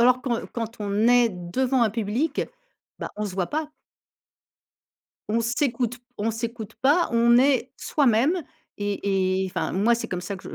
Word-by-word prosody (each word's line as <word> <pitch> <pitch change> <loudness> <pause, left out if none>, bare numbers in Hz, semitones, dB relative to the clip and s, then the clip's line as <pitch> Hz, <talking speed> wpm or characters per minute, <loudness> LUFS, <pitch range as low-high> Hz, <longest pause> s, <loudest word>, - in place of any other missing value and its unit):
alors 250 +1 +5
quand 240 -3 -1
quand 230 -1 -5
on 205 +2 +1
est 245 -1 +5
devant 240 +9 0
un 220 - +3
public, 230 +8 -1 0.6
bah - - -5
on 210 - -2
se 195 -3 -5
voit 185 -2 0
pas. 305 - -3 1.6
On 230 +2 +1
s'écoute 240 0 0 0.2
on 215 +2 0
s'écoute 225 -1 -5
pas, 300 +6 +4
on 235 +1 +5
est 260 -1 +2
soi-même 285 +5 +2 0.4
et 195 -2 0
et - - -2
enfin 185 - -3
moi 215 +5 +3
c'est 235 - -4
comme 180 -1 -3
ça 200 +2 -5
que 185 - -10
230 Hz, 165 wpm, -25 LUFS, 205-250 Hz, 1.6 s, alors